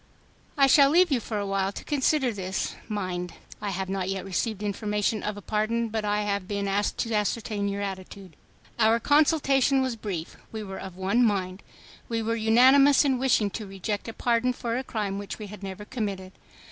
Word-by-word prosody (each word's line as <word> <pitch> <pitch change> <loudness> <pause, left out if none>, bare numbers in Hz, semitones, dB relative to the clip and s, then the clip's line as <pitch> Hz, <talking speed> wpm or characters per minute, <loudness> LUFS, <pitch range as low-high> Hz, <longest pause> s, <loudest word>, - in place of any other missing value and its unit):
"I 275 - +6
shall 275 +1 +6
leave 350 +2 +4
you 265 - +3
for 220 -1 -4
a 205 - -2
while 195 0 0
to - - -8
consider 280 -2 +1
this. 190 -1 -3
Mind! 185 -4 -4 0.3
I 205 - -2
have 190 0 -3
not 190 -1 -2
yet 195 -1 -3
received 205 +2 -2
information 210 +1 -1
of 210 -1 -3
a 205 - -9
pardon, 225 +2 0
but 220 0 -2
I 210 0 0
have 200 -2 -2
been 200 -1 -2
asked 200 +1 0
to 230 - -2
ascertain 210 -1 -1
your 200 0 -2
attitude." 190 -2 -7 0.4
Our 225 +1 +4
consultation 280 -1 +3
was 260 -2 -2
brief. 190 -7 -5
We 220 -1 -5
were 190 -1 -7
of 185 -2 -8
one 195 +6 +2
mind. 190 -4 0 0.5
We 230 -1 -1
were 230 +1 0
unanimous 260 +6 +5
in 265 -3 +2
wishing 230 -6 +2
to 215 0 -6
reject 195 +3 -4
a 225 - -5
pardon 240 +2 +1
for 235 -1 -3
a 255 - -2
crime 205 -5 -3
which 205 - -6
we 215 - -7
had 205 0 -10
never 195 +1 -7
committed. 200 -6 -4
210 Hz, 195 wpm, -26 LUFS, 195-235 Hz, 0.5 s, I